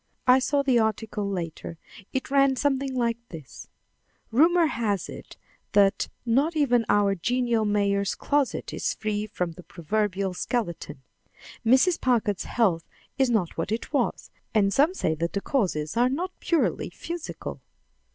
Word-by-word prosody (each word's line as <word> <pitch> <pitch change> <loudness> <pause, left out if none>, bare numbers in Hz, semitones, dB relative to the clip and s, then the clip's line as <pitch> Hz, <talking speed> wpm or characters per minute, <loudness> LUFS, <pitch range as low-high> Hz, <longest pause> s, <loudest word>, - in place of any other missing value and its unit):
I 255 +1 +6
saw 280 +2 +1
the 260 -4 +3
article 220 -2 -1
later. 170 -3 -5 0.3
It 265 0 -3
ran 275 -1 +4
something 270 0 0
like 235 -2 0
this: 155 -6 -10 0.6
"Rumor 330 +8 +5
has 215 - -1
it - - -10 0.4
that 200 -1 +3 0.2
not 275 +8 +2
even 245 -6 +2
our 205 -1 +3
genial 235 +3 0
mayor's 200 -1 +1
closet 285 -3 -1
is - - -2
free 215 -1 -2
from 180 -5 -3
the 180 - -12
proverbial 195 +2 -2
skeleton. 180 - -3 0.6
Mrs. 260 +9 +4
Packard's 225 -6 +1
health 185 -9 0 0.3
is 265 -2 +4
not 210 -8 0
what 165 - -2
it 225 +6 -3
was, 265 -5 -1 0.2
and 200 -2 +3
some 310 - +3
say 160 - 0
that 170 +2 -3
the 200 - 0
causes 175 - -1
are 245 +2 +3
not 345 +8 -2
purely 335 -3 0
physical." 340 -1 -7
225 Hz, 145 wpm, -26 LUFS, 195-265 Hz, 0.6 s, I